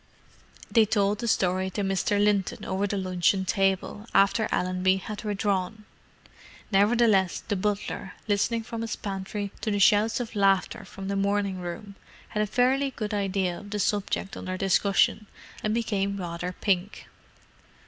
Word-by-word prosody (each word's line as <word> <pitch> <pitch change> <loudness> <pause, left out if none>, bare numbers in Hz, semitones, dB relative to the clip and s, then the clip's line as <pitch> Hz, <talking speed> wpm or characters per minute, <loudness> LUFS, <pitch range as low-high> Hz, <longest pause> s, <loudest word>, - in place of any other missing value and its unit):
They 225 -2 +5
told 205 -1 +1
the 235 - -3
story 185 -3 +1
to 205 +2 -3
Mr. 195 +1 0
Linton 205 -2 +1
over 195 +2 -1
the 200 - -2
luncheon 185 0 +1
table, 195 +3 0
after 200 +3 +3
Allenby 185 +1 +1
had 205 +3 -7
withdrawn. 205 0 -1 0.9
Nevertheless, 205 -2 +3
the 205 - 0
butler, 200 -1 -3
listening 225 +3 +1
from 230 0 -6
his 230 - -3
pantry 200 0 -4
to 220 - -1
the 205 - 0
shouts 210 +4 +4
of 235 -2 -5
laughter 195 -2 +2
from 195 0 -8
the 200 - -1
morning 200 -1 0
room, 180 +3 -6 0.4
had 210 - -1
a 210 - +1
fairly 260 +5 +2
good 215 -4 -5
idea 195 -3 -1
of 205 - -11
the 210 - -3
subject 200 -1 -1
under 185 0 -5
discussion, 195 +2 +2 0.4
and 215 - 0
became 200 -4 -1
rather 175 -1 -4
pink. 190 +1 -1
200 Hz, 150 wpm, -27 LUFS, 190-210 Hz, 0.9 s, They